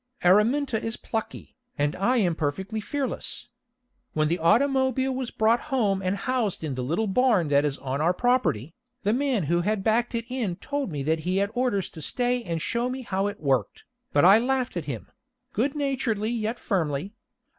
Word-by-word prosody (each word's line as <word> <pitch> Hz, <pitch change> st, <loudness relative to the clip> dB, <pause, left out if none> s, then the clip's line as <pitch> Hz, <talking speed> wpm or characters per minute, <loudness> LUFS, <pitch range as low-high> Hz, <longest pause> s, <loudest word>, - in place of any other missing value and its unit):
Araminta 220 Hz, +6 st, +3 dB
is 225 Hz, +1 st, -2 dB
plucky, 225 Hz, -1 st, -5 dB, 0.2 s
and 145 Hz, +2 st, 0 dB
I 240 Hz, +7 st, +2 dB
am 185 Hz, -7 st, +2 dB
perfectly 190 Hz, +9 st, -2 dB
fearless. 270 Hz, -1 st, -3 dB, 0.6 s
When 155 Hz, -1 st, +1 dB
the 170 Hz, +2 st, 0 dB
automobile 260 Hz, +7 st, +2 dB
was 255 Hz, -2 st, -3 dB
brought 225 Hz, +2 st, +2 dB
home 210 Hz, -8 st, +1 dB
and 185 Hz, +1 st, 0 dB
housed 225 Hz, -4 st, -1 dB
in 150 Hz, -3 st, -2 dB
the 130 Hz, -, -3 dB
little 165 Hz, -, 0 dB
barn 210 Hz, -, +2 dB
that 145 Hz, +1 st, +4 dB
is 145 Hz, -2 st, -1 dB
on 135 Hz, +1 st, -3 dB
our 170 Hz, +3 st, +4 dB
property, 180 Hz, -, +1 dB, 0.3 s
the 210 Hz, +2 st, +2 dB
man 260 Hz, -6 st, +1 dB
who 170 Hz, +4 st, +1 dB
had 205 Hz, +2 st, 0 dB
backed 235 Hz, +3 st, +1 dB
it 230 Hz, 0 st, -2 dB
in 240 Hz, -8 st, -2 dB
told 280 Hz, +3 st, -3 dB
me 145 Hz, -2 st, -3 dB
that 160 Hz, +3 st, +1 dB
he 180 Hz, +4 st, -1 dB
had 200 Hz, +1 st, +1 dB
orders 245 Hz, -7 st, 0 dB
to 160 Hz, -, -10 dB
stay 245 Hz, -, 0 dB
and 165 Hz, -5 st, -2 dB
show 240 Hz, +1 st, 0 dB
me 260 Hz, 0 st, -4 dB
how 195 Hz, -3 st, -1 dB
it 205 Hz, 0 st, -5 dB
worked, 135 Hz, -8 st, 0 dB, 0.3 s
but 145 Hz, +3 st, +4 dB
I 195 Hz, +4 st, +8 dB
laughed 255 Hz, -1 st, 0 dB
at 170 Hz, -4 st, -3 dB
him 130 Hz, -6 st, -6 dB, 0.4 s
good 270 Hz, +6 st, 0 dB
naturedly 250 Hz, -7 st, -1 dB
yet 230 Hz, 0 st, -2 dB
firmly. 170 Hz, -1 st, -1 dB
210 Hz, 190 wpm, -26 LUFS, 170-250 Hz, 0.6 s, I